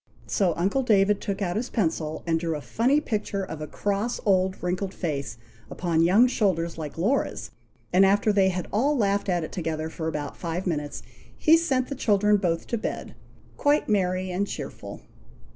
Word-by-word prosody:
So 185 -6 +1
uncle 195 +10 +1
David 205 -4 +3
took 200 0 -2
out 175 -2 -1
his 240 +3 -2
pencil, 160 -7 -1
and 165 -1 +1
drew 165 -1 -2
a 150 - -5
funny 255 - +2
picture 210 -7 -2
of 160 -4 -6
a 155 - -4
cross 205 +8 -2
old 190 -2 +2
wrinkled 185 +2 -2
face 145 -8 -3 0.3
upon 170 -2 0
young 190 +8 +6
shoulders, 185 -9 0
like 155 -2 -7
Laura's, 215 +12 -1 0.4
and 185 +2 +6
after 205 +2 +3
they 195 -2 +4
had 180 -2 -3
all 275 +8 +2
laughed 200 -3 +1
at 175 -2 +1
it - - -6
together 160 -2 -3
for 160 -1 -4
about 150 -3 -4
five 170 +2 -4
minutes, 150 -5 -3 0.3
he 315 - +6
sent 270 -7 +1
the - - -4
children 210 -5 +3
both 170 -4 -1
to 235 - -2
bed, - - -4 0.4
quite 290 +1 +2
merry 185 -3 0
and 195 +3 -1
cheerful. - - -7
190 Hz, 180 wpm, -26 LUFS, 165-210 Hz, 0.4 s, young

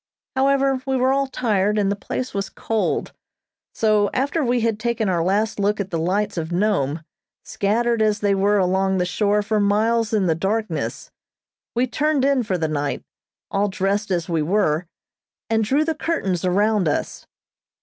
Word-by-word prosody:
However, 270 0 +2
we 265 -1 +1
were 260 +1 +2
all 275 0 +1
tired 210 -5 0
and 200 -1 +2
the - - 0
place 255 +5 -5
was 195 -1 -2
cold, 225 -1 -2 0.6
so 215 -2 +2
after 285 +5 0
we 245 -1 +1
had 225 -2 0
taken 235 -1 -1
our 175 -3 +1
last 210 +4 0
look 205 +1 +1
at 195 -1 -3
the 165 - -1
lights 195 +4 -1
of 160 0 -3
Nome, 170 -6 0 0.4
scattered 230 +3 0
as 215 -1 +2
they 205 -1 +2
were 200 +2 +2
along 190 0 +1
the 180 - +1
shore 205 +3 +1
for 215 0 0
miles 220 +3 +2
in 210 -4 +2
the 165 - +3
darkness, 210 +7 -3 0.6
we 245 +2 +2
turned 290 +1 0
in 275 -2 +3
for 195 -5 -1
the 160 -2 -1
night, 145 -2 -2 0.5
all 200 +1 +1
dressed 195 +2 -1
as 175 -3 -1
we 165 -2 0
were, 175 -1 +1 0.6
and 220 0 +2
drew 280 +8 +2
the 320 - 0
curtains 240 - -2
around 200 +1 +2
us. 145 - -3
210 Hz, 175 wpm, -22 LUFS, 190-235 Hz, 0.6 s, the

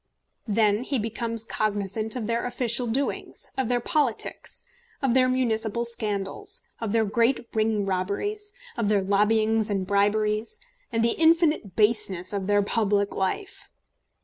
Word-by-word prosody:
Then 215 +1 +2
he 270 +1 -1
becomes 230 0 -2
cognisant 215 +1 -1
of 240 -4 -3
their 230 +1 -1
official 245 0 0
doings, 265 +5 -3
of 265 -3 -1
their 245 -1 +2
politics, 270 -2 -2 0.4
of 270 -4 +1
their 255 0 +4
municipal 235 -2 0
scandals, 235 - -2 0.2
of 225 -3 -3
their 225 0 +2
great 235 +3 +1
ring 215 -2 +1
robberies, 200 - -2 0.2
of 230 -4 0
their 205 -2 +2
lobbyings 215 +2 +2
and 195 -2 -1
briberies, 210 +2 +1 0.3
and 225 -1 +1
the 235 - +4
infinite 320 - +3
baseness 210 -4 +2
of 195 -2 -2
their 205 0 +3
public 205 -1 +1
life. 280 - -3
220 Hz, 140 wpm, -26 LUFS, 205-240 Hz, 0.4 s, their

